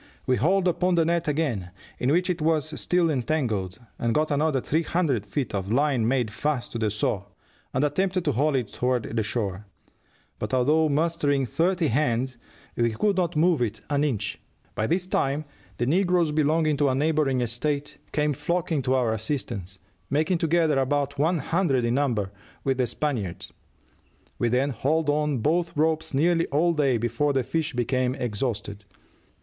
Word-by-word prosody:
We 125 Hz, -, +2 dB
hauled 185 Hz, -, +2 dB
upon 180 Hz, +1 st, +2 dB
the 165 Hz, -1 st, +3 dB
net 170 Hz, 0 st, 0 dB
again, 140 Hz, -, -1 dB, 0.3 s
in 125 Hz, -, +1 dB
which 180 Hz, +4 st, +2 dB
it 180 Hz, -3 st, -1 dB
was 155 Hz, -1 st, 0 dB
still 175 Hz, -2 st, +2 dB
entangled, 120 Hz, -, -1 dB, 0.2 s
and 115 Hz, -1 st, 0 dB
got 155 Hz, 0 st, +1 dB
another 145 Hz, -1 st, +2 dB
three 155 Hz, +5 st, 0 dB
hundred 150 Hz, -, 0 dB
feet 130 Hz, +2 st, -3 dB
of 100 Hz, 0 st, -2 dB
line 135 Hz, -3 st, +2 dB
made 125 Hz, -3 st, +1 dB
fast 140 Hz, +2 st, -2 dB
to 115 Hz, -, -4 dB
the 110 Hz, -1 st, +1 dB
saw, 100 Hz, -1 st, -1 dB, 0.5 s
and 130 Hz, -, 0 dB
attempted 185 Hz, +5 st, 0 dB
to 145 Hz, -, +2 dB
haul 140 Hz, +4 st, +1 dB
it 125 Hz, -6 st, -1 dB
toward 125 Hz, -1 st, 0 dB
the 115 Hz, -, +2 dB
shore; 105 Hz, -2 st, -3 dB, 0.7 s
but 130 Hz, -, -1 dB
although 150 Hz, +5 st, +3 dB
mustering 145 Hz, -2 st, +1 dB
thirty 170 Hz, -, +1 dB
hands, 130 Hz, -1 st, 0 dB, 0.4 s
we 120 Hz, 0 st, +2 dB
could 200 Hz, -, +1 dB
not 175 Hz, -2 st, 0 dB
move 160 Hz, -2 st, +3 dB
it 110 Hz, -2 st, -2 dB
an 145 Hz, 0 st, +2 dB
inch. 110 Hz, -8 st, -2 dB, 0.3 s
By 110 Hz, -, -1 dB
this 180 Hz, +5 st, 0 dB
time 145 Hz, -4 st, 0 dB, 0.3 s
the 120 Hz, -, 0 dB
negroes 175 Hz, +2 st, +2 dB
belonging 155 Hz, 0 st, +2 dB
to 145 Hz, -1 st, +3 dB
a 130 Hz, -, +1 dB
neighboring 145 Hz, -2 st, +1 dB
estate 140 Hz, +5 st, -2 dB
came 150 Hz, -1 st, +1 dB
flocking 170 Hz, 0 st, -1 dB
to 130 Hz, +1 st, +1 dB
our 120 Hz, -4 st, +2 dB
assistance, 105 Hz, -5 st, -3 dB, 0.3 s
making 160 Hz, +5 st, +1 dB
together 160 Hz, -3 st, +2 dB
about 140 Hz, +1 st, 0 dB
one 165 Hz, +4 st, +2 dB
hundred 155 Hz, -7 st, +1 dB
in 120 Hz, -, +1 dB
number, 120 Hz, -8 st, 0 dB, 0.3 s
with 135 Hz, -1 st, 0 dB
the 125 Hz, -, +2 dB
Spaniards. 115 Hz, -, -3 dB, 0.9 s
We 120 Hz, -, +2 dB
then 130 Hz, +4 st, +1 dB
hauled 150 Hz, +4 st, +1 dB
on 150 Hz, -1 st, 0 dB
both 170 Hz, +4 st, 0 dB
ropes 160 Hz, +1 st, +1 dB
nearly 165 Hz, +4 st, +2 dB
all 165 Hz, +4 st, +2 dB
day 140 Hz, -6 st, +2 dB
before 120 Hz, +6 st, 0 dB
the 135 Hz, -2 st, +1 dB
fish 160 Hz, +4 st, -2 dB
became 125 Hz, +1 st, 0 dB
exhausted. 105 Hz, -4 st, -3 dB
145 Hz, 170 wpm, -25 LUFS, 120-160 Hz, 0.9 s, the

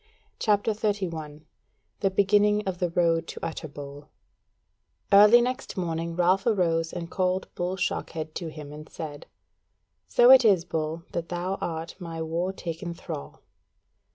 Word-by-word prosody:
CHAPTER 210 Hz, 0 st, +2 dB
31 170 Hz, -8 st, -3 dB, 0.5 s
The 195 Hz, -, +2 dB
Beginning 205 Hz, +2 st, +3 dB
of 180 Hz, -2 st, -3 dB
the 180 Hz, -, 0 dB
Road 165 Hz, -1 st, +1 dB
To -, -, -7 dB
Utterbol 145 Hz, -2 st, -7 dB, 1.1 s
Early 210 Hz, +4 st, +8 dB
next 250 Hz, -3 st, -3 dB
morning 165 Hz, -2 st, -2 dB
Ralph 185 Hz, +4 st, +2 dB
arose 165 Hz, -6 st, +1 dB
and 170 Hz, -1 st, -6 dB
called 185 Hz, 0 st, 0 dB
Bull 180 Hz, +1 st, -2 dB
Shockhead 160 Hz, -4 st, -3 dB
to 170 Hz, -, -5 dB
him 150 Hz, -2 st, -9 dB
and 155 Hz, +1 st, -10 dB
said: 150 Hz, -3 st, -8 dB, 0.8 s
"So 240 Hz, +1 st, +6 dB
it 265 Hz, -1 st, +9 dB
is, 190 Hz, -6 st, +4 dB
Bull, 160 Hz, -1 st, -3 dB
that 170 Hz, -1 st, -4 dB
thou 180 Hz, +2 st, -3 dB
art 165 Hz, 0 st, -4 dB
my 165 Hz, -2 st, -6 dB
war 165 Hz, +3 st, -1 dB
taken 170 Hz, -1 st, -6 dB
thrall." 70 Hz, -, -8 dB
175 Hz, 140 wpm, -26 LUFS, 160-195 Hz, 1.1 s, it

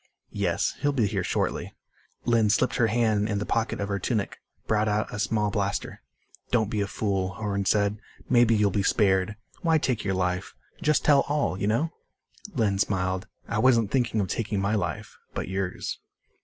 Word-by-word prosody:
"Yes. 95 Hz, -4 st, 0 dB
He'll 145 Hz, 0 st, +1 dB
be 120 Hz, -6 st, +2 dB
here 100 Hz, -2 st, -1 dB
shortly." -, -, -2 dB, 0.5 s
Lynn 115 Hz, -3 st, +3 dB
slipped 105 Hz, -, +2 dB
her 120 Hz, -3 st, +4 dB
hand 110 Hz, -2 st, +1 dB
in 100 Hz, -, 0 dB
the 100 Hz, -, -2 dB
pocket 115 Hz, 0 st, -1 dB
of 100 Hz, -, -1 dB
her 100 Hz, 0 st, -2 dB
tunic, 105 Hz, +1 st, -2 dB, 0.3 s
brought 110 Hz, 0 st, +1 dB
out 105 Hz, +1 st, 0 dB
a 105 Hz, -, -4 dB
small 105 Hz, 0 st, +1 dB
blaster. 100 Hz, -2 st, -2 dB, 0.5 s
"Don't 110 Hz, -3 st, +1 dB
be 105 Hz, -, 0 dB
a 100 Hz, -, 0 dB
fool," 95 Hz, -2 st, -1 dB
Horn 100 Hz, -2 st, -2 dB
said. 105 Hz, +1 st, +2 dB, 0.3 s
"Maybe 120 Hz, -2 st, +5 dB
you'll 105 Hz, -2 st, +3 dB
be 100 Hz, -, +1 dB
spared. 95 Hz, +1 st, +2 dB, 0.3 s
Why 165 Hz, -2 st, +3 dB
take 125 Hz, -7 st, -1 dB
your 95 Hz, -1 st, 0 dB
life? 90 Hz, -1 st, -1 dB, 0.3 s
Just 150 Hz, -1 st, +2 dB
tell 145 Hz, -2 st, +6 dB
all 145 Hz, -9 st, +1 dB
you 100 Hz, -, -2 dB
know?" 140 Hz, +10 st, +1 dB, 0.6 s
Lynn 105 Hz, -6 st, +1 dB
smiled. 95 Hz, 0 st, 0 dB, 0.2 s
"I 105 Hz, -, -1 dB
wasn't 115 Hz, -4 st, +4 dB
thinking 120 Hz, -4 st, +1 dB
of 100 Hz, -, 0 dB
taking 105 Hz, +1 st, -2 dB
my 100 Hz, +2 st, 0 dB
life. 95 Hz, -5 st, -3 dB, 0.2 s
But -, -, -3 dB
yours." 95 Hz, -1 st, -3 dB
105 Hz, 185 wpm, -26 LUFS, 100-115 Hz, 0.6 s, tell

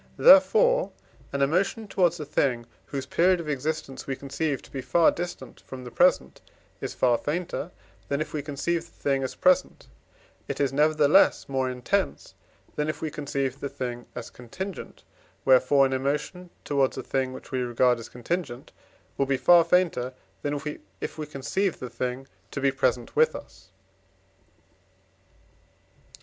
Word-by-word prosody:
Therefore -, -, +6 dB, 0.4 s
an 140 Hz, 0 st, 0 dB
emotion 190 Hz, +9 st, 0 dB
towards 175 Hz, -4 st, +1 dB
a 150 Hz, -, -4 dB
thing, 125 Hz, -4 st, 0 dB, 0.2 s
whose 140 Hz, -1 st, -4 dB
period 180 Hz, +6 st, +3 dB
of 165 Hz, -, -6 dB
existence 145 Hz, -1 st, -3 dB
we 135 Hz, -, -2 dB
conceive 140 Hz, +1 st, -3 dB
to -, -, -16 dB
be 135 Hz, -, -4 dB
far 170 Hz, +5 st, +4 dB
distant 175 Hz, 0 st, -7 dB
from 130 Hz, -1 st, -9 dB
the 125 Hz, -, -9 dB
present, -, -, +2 dB, 0.4 s
is -, -, -4 dB
far 120 Hz, -2 st, +3 dB
fainter, 170 Hz, +1 st, -3 dB, 0.4 s
than 140 Hz, -, -1 dB
if 155 Hz, -, -4 dB
we 150 Hz, -, -2 dB
conceive 155 Hz, +4 st, -2 dB
the 170 Hz, -, -19 dB
thing 135 Hz, -1 st, +1 dB
as 130 Hz, -, -4 dB
present; 185 Hz, 0 st, +2 dB, 0.6 s
it -, -, -4 dB
is, 135 Hz, -2 st, +1 dB
nevertheless, 150 Hz, +4 st, +4 dB
more 130 Hz, -1 st, -1 dB
intense, 130 Hz, +11 st, -2 dB, 0.4 s
than 150 Hz, +1 st, -1 dB
if 155 Hz, 0 st, -3 dB
we 160 Hz, -1 st, -3 dB
conceived 140 Hz, -2 st, -3 dB
the 140 Hz, -, -3 dB
thing 120 Hz, -2 st, -5 dB
as 125 Hz, -2 st, -7 dB
contingent, 180 Hz, -, -8 dB, 0.4 s
wherefore 135 Hz, +1 st, +5 dB
an 135 Hz, -, -1 dB
emotion 150 Hz, +7 st, -2 dB, 0.2 s
towards 140 Hz, -2 st, +1 dB
a -, -, -4 dB
thing, 130 Hz, -1 st, -1 dB
which 130 Hz, -, -11 dB
we 130 Hz, -1 st, -1 dB
regard 120 Hz, 0 st, +2 dB
as 115 Hz, -, -9 dB
contingent, 125 Hz, 0 st, -4 dB, 0.5 s
will 140 Hz, -, +2 dB
be 135 Hz, -1 st, +1 dB
far 175 Hz, +4 st, +6 dB
fainter, 165 Hz, -8 st, +1 dB, 0.3 s
than 145 Hz, 0 st, -2 dB, 0.4 s
if -, -, -5 dB
we 155 Hz, -, -3 dB
conceived 170 Hz, +7 st, -2 dB
the 125 Hz, -2 st, -7 dB
thing 125 Hz, +2 st, -4 dB, 0.2 s
to -, -, -5 dB
be 140 Hz, 0 st, +2 dB
present 130 Hz, -3 st, -1 dB
with -, -, +4 dB
us. 95 Hz, -, -12 dB
140 Hz, 160 wpm, -26 LUFS, 130-165 Hz, 0.6 s, Therefore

